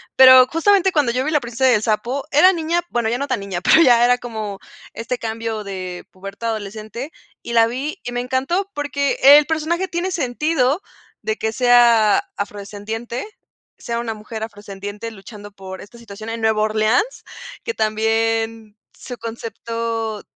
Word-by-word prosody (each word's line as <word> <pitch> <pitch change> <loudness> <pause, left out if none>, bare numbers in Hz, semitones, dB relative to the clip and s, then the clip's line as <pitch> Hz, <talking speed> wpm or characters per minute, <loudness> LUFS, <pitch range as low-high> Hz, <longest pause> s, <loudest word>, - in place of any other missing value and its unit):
Pero 260 -1 +9
justamente 380 +5 +3
cuando 295 -8 +2
yo 255 +2 -1
vi 310 - -1
La 300 - +3
Princesa 240 +2 +1
y - - +5
el 210 - 0
Sapo, 235 +5 -1
era 360 +7 +6
niña, 335 0 0
bueno, 235 -2 0
ya 235 - 0
no 280 +2 -3
tan - - -1
niña, 195 -3 -4
pero 315 - +5
ya 240 -5 +6
era 245 0 +3
como 215 -5 -6 0.3
este 230 +2 -4
cambio 225 -1 -4
de 185 -3 -6
pubertad 195 +4 -6
adolescente 220 +6 -6 0.3
y 235 - -6
la 230 -1 +5
vi 275 - -4
y 245 - -5
me 245 - -2
encantó 270 +10 -1
porque 285 -1 -1
el 290 +2 +8
personaje 325 +4 -1
tiene 355 +2 -3
sentido 300 +2 0 0.4
de 220 +1 -1
que 220 - -2
sea 235 -3 +4
afrodescendiente, 205 - -5 0.5
sea 235 -1 -4
una 235 -1 -3
mujer 220 +1 -7
afrodescendiente 205 0 -7
luchando 205 0 -11
por 190 -1 -9
esta 210 +4 -14
situación 220 -1 -10
en 230 0 -4
Nueva 220 -1 +2
Orleans, 215 - +1 0.4
que 465 - -3
también 225 - -1 0.2
su 245 - -9
concepto 230 -1 -4
230 Hz, 165 wpm, -20 LUFS, 215-265 Hz, 0.5 s, Pero